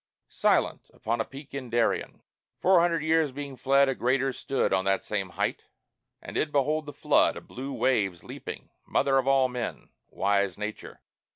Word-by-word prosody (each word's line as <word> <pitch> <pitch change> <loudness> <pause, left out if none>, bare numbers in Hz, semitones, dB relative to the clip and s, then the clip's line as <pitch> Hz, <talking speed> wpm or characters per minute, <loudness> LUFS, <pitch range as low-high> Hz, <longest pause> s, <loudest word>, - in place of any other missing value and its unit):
"Silent, - - +1
upon 115 +1 -1
a - - +1
peak 140 +3 -12
in 135 -3 -5
Darien" 115 0 0 0.4
Four 185 -1 +5
hundred 170 -2 +2
years 160 -2 +2
being 140 0 -6
fled, 135 +2 +3
a 135 - +1
Greater 130 +2 +1
stood 135 -6 -1
On 95 0 +2
that 95 0 +1
same 100 -3 -2
height; 85 - -2 0.6
and - - -8
did 150 - 0
behold 150 +2 +1
the - - -5
flood - - +2
Of - - -10
blue 135 +3 -6
waves 100 -11 0
leaping; - - -8 0.2
Mother 135 -1 +2
of 130 - -2
all 135 -1 +4
men! 125 -2 -5 0.2
Wise 100 -1 0
Nature! 105 +1 -6
130 Hz, 175 wpm, -27 LUFS, 110-140 Hz, 0.6 s, Four